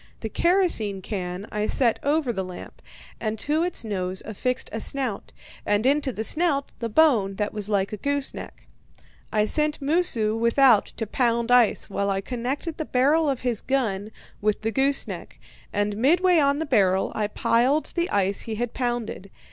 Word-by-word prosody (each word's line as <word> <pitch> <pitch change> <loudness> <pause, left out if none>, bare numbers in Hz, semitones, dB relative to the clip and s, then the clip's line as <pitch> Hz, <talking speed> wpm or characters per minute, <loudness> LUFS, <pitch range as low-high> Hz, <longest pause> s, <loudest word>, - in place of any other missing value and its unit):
The 220 - -4
kerosene 280 - +2
can 185 0 -5
I 210 0 -1
set 240 -4 +1
over 285 -3 0
the 190 -2 -2
lamp, 185 -1 -10 0.4
and 220 -1 -3
to 300 +8 0
its 350 -8 -1
nose 185 -3 -3
I 215 - -6
affixed 250 +4 -2
a 225 - -3
snout, 255 -7 -4 0.3
and 205 +2 0
into 280 0 +2
the 220 -2 -4
snout 290 +1 +1
the 230 - -3
bone 220 -8 +3
that 210 +1 -2
was 210 -1 -3
like 200 -1 0
a - - -3
gooseneck. 285 +3 -4 0.7
I 210 -1 +2
sent 300 +5 +1
Moosu 275 -8 +2
without 235 0 +4
to 225 - -2
pound 235 +1 0
ice, 245 -3 +4
while 200 0 -2
I 195 0 0
connected 255 - -4
the 315 - -2
barrel 290 +5 +2
of 265 -3 -2
his 245 -4 -1
gun 215 -7 -1 0.3
with 210 +1 0
the 225 - 0
gooseneck, 275 +3 -1 0.3
and 205 0 -1
midway 340 - +3
on 280 -1 +2
the 320 - -2
barrel 195 -8 +2
I 210 - -1
piled 245 +8 +1
the 345 0 -1
ice 200 0 +2
he 225 - -4
had 240 +1 -3
pounded. 240 -6 -3
235 Hz, 175 wpm, -24 LUFS, 210-280 Hz, 0.7 s, without